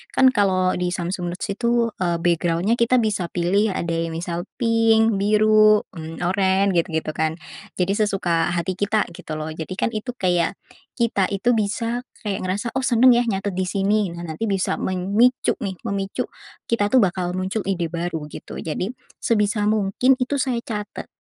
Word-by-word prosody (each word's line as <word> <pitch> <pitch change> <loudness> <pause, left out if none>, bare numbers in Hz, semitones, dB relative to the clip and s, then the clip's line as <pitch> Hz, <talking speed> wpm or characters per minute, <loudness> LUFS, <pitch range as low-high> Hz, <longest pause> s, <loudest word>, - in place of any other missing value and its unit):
Kan, 260 -1 +6
kalau 185 -5 +2
di 180 0 0
Samsung 175 0 -3
Notes - - -5
itu, 235 +2 +1
eee, 175 -2 +1
background-nya 175 +6 +1
kita 235 +2 +3
bisa 200 -5 -1
pilih. 190 +4 +1
Ada 165 -1 -1
yang 160 - -6
misal 175 +2 -4
pink, 225 -2 +3
biru, 215 +1 +5
mmm, 165 -1 -8
oren, 190 +1 +2
gitu-gitu, 160 -3 0
kan. 160 +1 -1 0.4
Jadi 180 +1 0
sesuka 185 -6 +1
hati 185 +2 -2
kita, 210 +1 +1
gitu, 160 -2 -8
loh. 155 +1 -4
Jadi, 160 +3 -6
kan, 220 - 0
itu 230 +3 -4
kayak, 180 -2 +1 0.4
kita 230 -6 +1
itu 200 +5 +1
bisa 230 +3 -1 0.2
kayak 205 -1 -2
ngerasa, 205 +6 -2
"Oh, 265 - -1
senang 250 +2 +6
ya, 240 0 +4
nyatet 200 -1 -1
di 185 - 0
sini." 200 0 +1
Nah, 170 - -7
nanti 160 +8 -3
bisa 195 -2 0
memicu 200 +7 +2
nih, 195 -3 -3
memicu 195 0 -2 0.5
kita, 205 -3 +2
tuh, 260 - +7
bakal 180 -1 -1
muncul 190 +3 -2
ide 175 -4 0
baru, 170 -3 -3
gitu. - - -8
Jadi, 170 +6 -3 0.3
sebisa 210 -1 +1
mungkin, 215 +5 +2
itu 275 +2 0
saya 250 -3 0
catat 210 -2 -6
195 Hz, 170 wpm, -22 LUFS, 175-220 Hz, 0.5 s, tuh